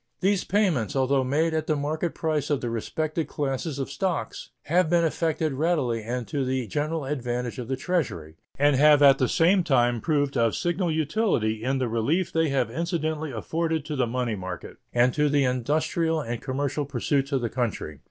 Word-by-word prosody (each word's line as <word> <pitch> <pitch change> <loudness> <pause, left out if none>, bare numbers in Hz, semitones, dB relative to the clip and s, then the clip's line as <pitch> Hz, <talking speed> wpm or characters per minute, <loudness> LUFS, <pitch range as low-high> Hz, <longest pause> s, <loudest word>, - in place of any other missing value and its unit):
These 195 0 +1
payments, 175 - +1
although 135 0 +2
made 155 +5 +1
at 155 -1 -1
the 155 - +2
market 155 +3 -2
price 155 -4 -1
of 145 -3 +1
the 120 - -3
respective 155 +7 -2
classes 140 +1 -3
of 135 - -4
stocks, 190 -4 -3
have 175 +2 +2
been 170 0 +3
effected 160 -1 0
readily 135 -6 0
and 120 +2 -4
to 145 -3 -1
the 130 -1 -1
general 150 - -2
advantage 125 -3 -3
of 120 - -5
the 130 - -1
Treasury, 125 - -2 0.2
and 145 0 +4
have 145 +1 +6
at 135 -1 +7
the 130 - +3
same 180 +2 +3
time 120 -6 +2
proved 145 -3 0
of 115 -2 +2
signal 175 0 0
utility 155 - 0
in 135 +2 0
the 130 -2 0
relief 120 +11 0
they 160 -1 +2
have 130 -4 0
incidentally 160 -1 -2
afforded 160 +6 -2
to 150 - -4
the 130 -3 +1
money 120 -1 -1
market 95 -2 -7
and 120 +1 +3
to 150 0 +2
the 145 -1 +3
industrial 155 +6 0
and 120 -5 -4
commercial 140 +2 -2
pursuits 140 +1 -1
of 135 -2 +1
the 120 - 0
country. 110 - -3
145 Hz, 190 wpm, -26 LUFS, 125-160 Hz, 0.2 s, at